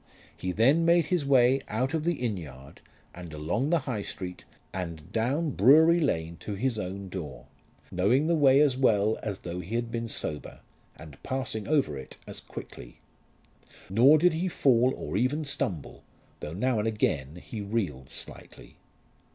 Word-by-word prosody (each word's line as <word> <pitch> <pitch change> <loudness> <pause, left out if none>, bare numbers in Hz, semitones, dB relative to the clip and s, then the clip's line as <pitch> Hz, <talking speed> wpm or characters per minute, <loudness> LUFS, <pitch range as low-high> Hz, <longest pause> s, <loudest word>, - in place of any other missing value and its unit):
He 95 - -3
then 135 - +4
made 170 -1 +4
his 160 -6 0
way 130 0 +4
out 130 +7 -1
of 160 -1 -1
the 175 0 +1
inn 120 -6 -2
yard, 70 -6 -11 0.3
and 85 -2 -9
along 85 - -1
the 170 -2 +2
High 115 -6 -2
Street, 90 -2 -7 0.3
and 85 -3 -6
down 140 +8 0
Brewery 155 - +6
Lane 85 - -1
to 105 - -6
his 115 +1 -1
own 95 0 -5
door, 75 -10 -7 0.5
knowing 105 +11 +2
the 170 - +2
way 140 -3 +5
as 145 -4 +3
well 110 -4 +2
as 100 -3 -4
though 90 0 -5
he 90 +6 -5
had 120 -1 -2
been 115 -1 -3
sober, 75 -8 -4 0.3
and 75 -3 -13
passing 130 -5 -3
over 140 - +1
it 65 - -11
as - - -7
quickly. - - -10 0.9
Nor 130 +9 +6
did 175 +2 +4
he 170 +4 -1
fall 130 -7 +3
or - - -3
even 140 +7 0
stumble, 95 - -4 0.4
though 75 - -6
now 115 +5 0
and 105 - 0
again 75 -10 -1
he 105 +5 -7
reeled 95 - -3
slightly. - - -10
110 Hz, 170 wpm, -28 LUFS, 90-140 Hz, 0.9 s, Brewery